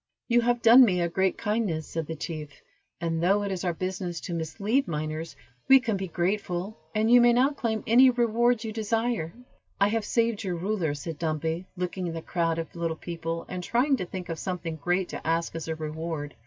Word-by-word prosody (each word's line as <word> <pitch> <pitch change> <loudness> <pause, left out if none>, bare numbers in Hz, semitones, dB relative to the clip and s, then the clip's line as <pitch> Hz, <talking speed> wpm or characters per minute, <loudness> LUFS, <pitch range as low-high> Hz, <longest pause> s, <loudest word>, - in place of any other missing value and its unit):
"You 240 -1 +4
have 240 0 +1
done 240 +3 +9
me 185 -7 +3
a 170 - +1
great 190 +2 0
kindness," 210 -8 -1
said 165 -2 -4
the 160 - -4
chief; 155 -1 -5 0.5
"and, 165 -1 -1
though 200 +4 +3
it 200 - -2
is 185 -1 -3
our 180 - +1
business 185 -1 -3
to 175 - -5
mislead 200 - 0
miners, 155 0 -4 0.3
we 270 0 +8
can 230 -5 -1
be 190 -1 -3
grateful, 180 +2 -2 0.2
and 220 +2 +2
you 245 0 +8
may 240 0 +6
now 260 +4 +4
claim 230 -6 -2
any 255 +3 +7
reward 240 -1 +2
you 220 - -4
desire." 225 -5 -1 0.5
"I 200 +1 +4
have 225 0 0
saved 230 0 0
your 185 -3 -2
ruler," 175 -4 -1
said 150 +1 -6
Dumpy, 160 +2 -2
looking 180 0 -3
at 165 - -4
the 165 - -5
crowd 165 -2 0
of 165 +1 -5
little 165 -1 -2
people, 165 -1 -5
and 180 0 -5
trying 255 +8 +2
to 185 - -3
think 180 0 -6
of 165 -1 -4
something 170 -4 -4
great 175 +4 0
to - - -7
ask 165 +1 0
as 165 - -5
a 160 - -2
reward. 155 -1 -5
180 Hz, 210 wpm, -27 LUFS, 165-225 Hz, 0.5 s, done